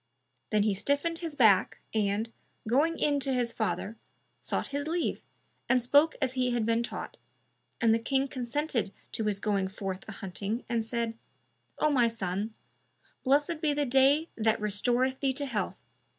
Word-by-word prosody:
Then 210 -1 +3
he 210 -1 +2
stiffened 285 - 0
his 330 -4 -4
back 215 -8 +4 0.2
and, 215 +1 0 0.3
going 300 +8 +2
in 290 -1 +2
to 275 -1 +1
his 240 -2 +1
father, 220 0 -2 0.4
sought - - -2
his 285 +1 -3
leave 335 +1 -1 0.5
and 255 - +5
spoke 285 +6 +4
as 260 -3 0
he 255 -1 +1
had 240 -2 0
been 230 +1 +2
taught, 235 - -5 0.6
and 225 -2 +4
the 225 - +2
King 270 +3 0
consented 255 -4 -2 0.2
to 220 - -2
his 205 -2 0
going 200 -2 0
forth 190 -1 -5
a - - -6
hunting 200 +5 -4
and 235 -2 0
said, 230 0 -3 0.6
"O 305 - +2
my 245 -4 +4
son, 210 -1 -3 0.7
blessed 290 +4 +2
be 295 -2 +1
the 290 0 +1
day 270 +5 +4
that 220 -1 +1
restoreth 245 +5 +1
thee 270 -1 +1
to 285 +2 -2
health! 235 -6 -2
240 Hz, 165 wpm, -29 LUFS, 215-280 Hz, 0.7 s, and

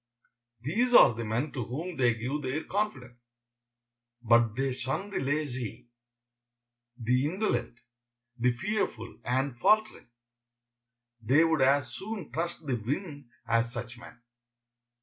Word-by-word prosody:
'" 120 -1 -50
These 235 - +1
are - - +9
the 115 +1 -5
men 115 +7 -1
to 125 - -3
whom 160 +10 -5
they 120 -4 +3
give 130 +6 -3
their 135 +3 -2
confidence. 130 - -3 1.0
But 115 -1 +4
they 135 0 0
shun 135 +11 -3
the - - -1
lazy, 130 -5 -3 1.1
the 125 +3 +1
indolent, 185 - -2 0.6
the 125 0 +2
fearful 125 - -3
and 130 +1 0
faltering. 215 - +2 1.1
They 135 +8 +4
would 160 -3 +2
as 130 -2 +3
soon 200 - -6
trust 170 0 -3
the 130 -4 0
wind 145 - -4 0.2
as 115 0 +2
such 120 +1 -6
men. 120 - -13
130 Hz, 130 wpm, -29 LUFS, 120-155 Hz, 1.1 s, are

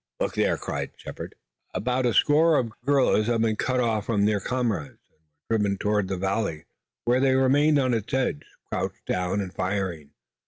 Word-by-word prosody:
"Look - - -1
there!" - - +1
cried - - -4
Shepard. - - -8 0.4
About 125 +6 0
a 120 - +1
score 155 +1 +5
of 120 - 0
the - - -17
guerrillas 130 -6 +3
had 115 -1 +2
been 110 -1 +1
cut 130 +4 0
off 110 -4 0
from 105 -3 +2
their 105 -1 +2
comrades 115 - -2
and - - -40 0.3
were 115 - +4
driven 100 -1 0
toward 105 -1 0
the 95 0 -2
valley, 95 -4 -2 0.4
where 125 +2 +3
they 130 0 +3
remained 145 +3 +4
on 130 -3 +2
its 110 -2 -2
edge, 130 - 0 0.3
crouched - - -3
down, 90 +2 -1
and 95 -2 -6
firing. 90 -6 -2
110 Hz, 190 wpm, -25 LUFS, 100-130 Hz, 0.4 s, score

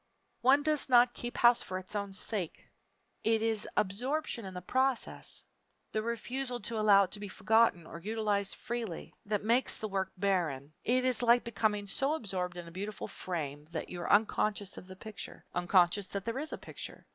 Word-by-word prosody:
One 270 +4 +5
does 305 -2 +1
not 245 -1 +6
keep 240 0 -5
house 240 0 +6
for 185 - -4
its 185 +3 -7
own 200 -1 -2
sake. 190 -3 -4 0.6
It 225 0 +3
is 225 -2 0
absorption 240 +5 -1
in 190 -1 -7
the 180 - -4
process 260 +4 -1 0.5
the 215 - 0
refusal 245 +3 -3
to 220 +2 -3
allow 205 -2 +7
it 185 - -4
to 205 - -2
be 205 - -5
forgotten 220 -4 +3
or 170 - -8
utilized 205 0 0
freely, 230 -8 -5
that 210 -1 0
makes 235 +4 +3
the 215 - -3
work 190 -2 -2
barren. 165 -8 0
It 255 +2 +2
is 255 -3 +1
like 240 0 +5
becoming 210 -2 0
so 270 +9 +2
absorbed 185 - -3
in 175 -1 -7
a - - -10
beautiful 205 +4 -5
frame 150 -5 -4
that 160 0 -5
you 175 - -5
are - - -1
unconscious 205 -1 +2
of 180 - -10
the 185 - -9
picture 215 +2 -8
unconscious 180 +2 +3
that 200 0 -4
there 230 +3 -2
is 310 +2 -4
a - - -4
picture. - - -8
210 Hz, 190 wpm, -32 LUFS, 185-235 Hz, 0.6 s, allow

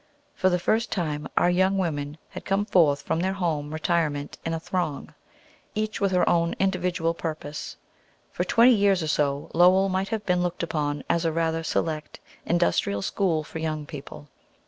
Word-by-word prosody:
For 185 - +2
the 180 - +2
first 220 +5 0
time, 150 -5 -2
our 175 - +4
young 190 +2 +2
women 150 -5 -2
had - - -8
come 195 +1 0
forth 155 -9 +3
from 160 - -1
their 190 +2 0
home 160 -6 -2
retirement 155 -3 -1
in 165 - -2
a - - -3
throng, 165 -4 -3 0.6
each 215 0 -2
with 200 -1 +2
her 180 -1 +2
own 170 0 +2
individual 180 -3 0
purpose. 155 -3 -6 0.5
For - - -1
twenty 240 +2 +5
years 200 -4 +3
or - - -2
so, 145 -2 0
Lowell 185 +3 +5
might 190 +1 -1
have 220 -2 -3
been 180 -2 +2
looked 180 -1 -2
upon 145 -3 -2
as 170 - +1
a 165 - +1
rather 165 0 0
select 155 -1 -2 0.3
industrial 165 - +1
school 170 - 0
for 160 - -7
young 155 -2 -3
people. 145 -1 -9
170 Hz, 175 wpm, -25 LUFS, 155-185 Hz, 0.6 s, twenty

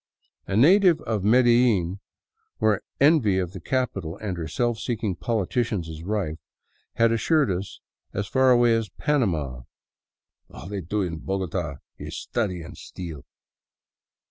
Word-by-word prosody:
A 100 - 0
native 180 - +6
of 110 -5 -2
Medellin, 115 -5 +3 0.6
where 110 -2 +2 0.2
envy 140 - +4
of 90 -2 -1
the 95 - -7
capital 110 -7 -2
and 100 -4 -4
her 85 -2 -4
self 120 +8 -1
seeking 110 -5 -2
politicians 105 -2 -1
is 80 -1 -8
rife, 90 -4 -2 0.6
had 115 0 +4
assured 140 +2 +2
us 95 +2 -4 0.3
as 100 - -2
far 130 +5 +3
away 120 -2 +5
as 115 -2 -2
Panama: 85 - -1 0.9
"All - - -10
they 100 -1 -4
do 100 +5 -1
in 85 -3 -4
Bogota 90 -5 -3 0.2
is - - -6
study 95 -7 -2
and - - -10
steal." 80 -6 -8
105 Hz, 140 wpm, -25 LUFS, 90-120 Hz, 0.9 s, native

